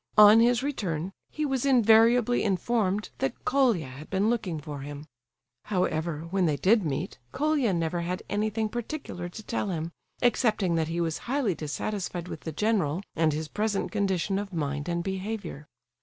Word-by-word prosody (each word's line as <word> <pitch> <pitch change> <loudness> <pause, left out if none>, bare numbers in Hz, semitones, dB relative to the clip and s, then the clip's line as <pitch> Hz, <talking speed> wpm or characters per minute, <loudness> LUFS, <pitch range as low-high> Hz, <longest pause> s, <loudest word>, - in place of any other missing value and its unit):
On 210 +1 +9
his 240 +1 +4
return 190 - -2 0.2
he 305 - -2
was 270 -3 0
invariably 240 -1 +5
informed 205 0 0
that 135 - -3
Colia 250 - +3
had 135 +4 -10
been 195 +4 +2
looking 190 -9 -2
for 145 -1 -7
him. 145 +2 -7 0.6
However, 170 -5 -1
when 190 -2 +2
they 150 -2 +1
did 210 +5 +4
meet, 140 -5 -3
Colia 290 -5 +1
never 170 -1 -1
had 180 +2 -3
anything 215 +1 0
particular 235 - -5
to 220 +5 -9
tell 205 - -2
him, 165 -2 -3 0.3
excepting 220 -6 +2
that 160 -1 +1
he 165 +1 -2
was 165 -2 -1
highly 260 -7 +1
dissatisfied 175 +3 -4
with - - -6
the 160 - -5
general 190 -2 0
and 160 -1 +3
his 155 +1 -3
present 210 +2 -1
condition 195 -2 0
of 205 -1 -5
mind 145 -2 -2
and 170 0 -1
behaviour. 190 -5 -4
195 Hz, 165 wpm, -27 LUFS, 165-225 Hz, 0.6 s, On